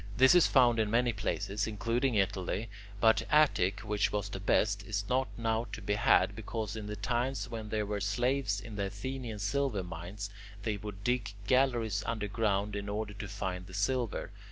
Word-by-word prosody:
This 130 +4 +7
is 180 -1 +6
found 120 -4 +5
in 110 -1 +2
many 120 +1 +2
places, 100 +1 -2
including 115 +4 0
Italy, 100 +2 0 0.3
but 110 +1 +5
Attic, 100 -11 +3
which 105 0 0
was 105 -1 -2
the 95 - -5
best, 100 +1 +2
is 100 -1 -2
not 130 +1 +1
now 115 0 0
to - - -4
be 105 - -1
had 105 0 +4
because 110 0 -4
in 110 -2 -5
the 105 - -4
times 125 +3 -1
when 110 -2 -5
there 105 -1 0
were 105 0 -3
slaves 120 +1 +1
in 105 +1 -8
the 100 - 0
Athenian 115 +3 -5
silver 105 +1 0
mines, 90 +4 -6 0.3
they 105 -1 -1
would 100 -1 -8
dig 120 -4 0
galleries 120 -4 +2
underground 105 -2 0
in 100 0 -4
order 105 0 -3
to 105 0 -6
find 95 -3 -4
the 95 - -9
silver. 120 +3 -1
105 Hz, 180 wpm, -31 LUFS, 100-120 Hz, 0.3 s, This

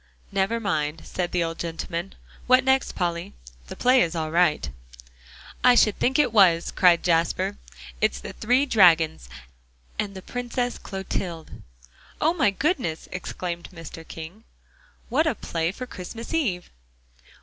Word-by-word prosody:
"Never 195 +4 0
mind," 160 -7 -2
said 175 -1 -3
the 175 -1 +1
old 165 0 -4
gentleman. 170 +2 -4 0.3
"What 255 +1 +6
next, 265 0 +2
Polly? 170 - -2 0.3
The - - -7
play 255 +1 +4
is 170 0 0
all 160 -1 -2
right." 170 -2 +2 1.0
"I 250 -1 +7
should 215 -3 +4
think 265 +3 +2
it 275 -6 +2
was," 175 -6 +5
cried 175 -2 +4
Jasper. 165 - +1 0.4
"It's - - +1
the - - -8
Three 250 +5 +2
Dragons, 165 - +4 0.7
and 200 -2 -2
the 190 - -8
Princess 245 0 -3
Clotilde." 180 -4 -5 0.6
"Oh, 320 +2 +3
my 290 -11 +3
goodness," 220 - -1
exclaimed 175 -1 -5
Mr. 165 -2 -9
King, 165 +7 -9 0.7
"What 300 +7 +2
a 300 - +1
play 165 -3 -2
for 255 +6 -7
Christmas 230 - -8
Eve!" 210 - -1
185 Hz, 140 wpm, -25 LUFS, 165-245 Hz, 1.0 s, I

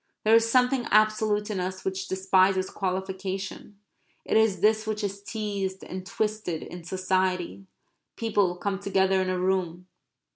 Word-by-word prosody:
There 215 - +4
is 230 0 +5
something 250 0 +2
absolute 215 0 +2
in 195 - -2
us 185 +1 -4
which 190 0 -2
despises 190 0 +2
qualification. 190 +1 -4 0.5
It - - -1
is 220 -5 +3
this 215 +1 +3
which 215 0 -2
is 200 0 -3
teased 200 -3 -4
and 185 +1 -6
twisted 210 -7 -2
in 175 -1 -9
society. 185 +1 -1 0.5
People 205 -5 +1
come 195 +1 -3
together 190 -1 +2
in 185 - -1
a 185 - 0
room. 180 -1 -1
190 Hz, 145 wpm, -27 LUFS, 185-215 Hz, 0.5 s, is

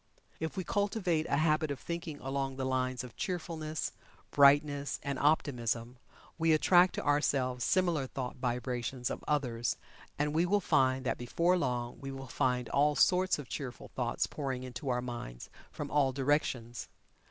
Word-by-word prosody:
If 160 +4 -4
we 185 - -1
cultivate 190 -5 0
a 140 - +1
habit 155 0 +2
of 140 - -3
thinking 170 -3 -5
along 135 0 -2
the 130 0 -3
lines 130 -1 -1
of 125 -3 -10
Cheerfulness, 160 -3 -3 0.4
Brightness 145 0 +4
and 140 -2 -2
Optimism, 125 -5 +1 0.4
we 165 0 +4
attract 175 +3 +5
to - - -4
ourselves 135 -4 +1
similar 170 -6 +2
thought 130 -1 -5
vibrations 125 0 -2
of - - -5
others 120 -6 0 0.4
and 150 +1 0
we 165 +3 +2
will 205 +3 +3
find 130 -7 +2
that - - -1
before 170 +9 +2
long 125 -7 -2
we 135 - -5
will 135 0 -7
find 125 0 0
all 145 +1 +3
sorts 185 +4 +4
of 145 -3 -8
cheerful 130 -3 -6
thoughts 120 -2 -1
pouring 135 -4 -4
into 130 +2 -5
our 125 0 0
minds 120 - -7 0.2
from - - -6
all 140 -2 +3
directions. 130 -4 -1
140 Hz, 160 wpm, -32 LUFS, 125-155 Hz, 0.4 s, attract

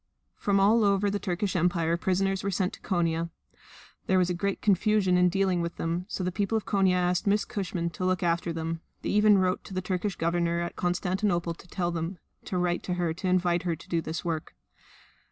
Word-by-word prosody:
From 200 -1 +1
all 215 +4 +5
over 200 0 +2
the 205 - -1
Turkish 190 0 -2
Empire 170 -1 +2
prisoners 190 +2 0
were 200 - 0
sent 185 -1 0
to - - -11
Konia. 170 -3 0 0.8
There 190 - +3
was 180 -1 +2
great 195 +3 -1
confusion 205 -1 +3
in 180 0 +5
dealing 185 -1 +1
with 170 0 -3
them, 170 +3 -2
so 190 - -3
the 180 - -1
people 205 +4 0
of 220 - -4
Konia 195 -2 +3
asked 180 +2 +1
Miss 205 +1 +3
Cushman 180 -4 -3
to 170 - -6
look 185 0 +1
after 170 0 +1
them; 165 0 -3 0.2
they - - -2
even 210 0 +5
wrote 185 0 +1
to 195 - -8
the - - +1
Turkish 185 +1 -2
Government 170 0 0
at 170 - -5
Constantinople 180 -1 0
to 175 - -16
tell 175 -1 -2
them 170 +2 -3 0.3
to 185 - -2
write 175 0 0
to 180 - -3
her 175 -2 0
to 185 +3 -4
invite 175 -1 +2
her 170 -2 -1
to - - -15
do 165 -1 +1
this 160 +2 -5
work. 160 -2 -3
180 Hz, 210 wpm, -28 LUFS, 170-195 Hz, 0.8 s, all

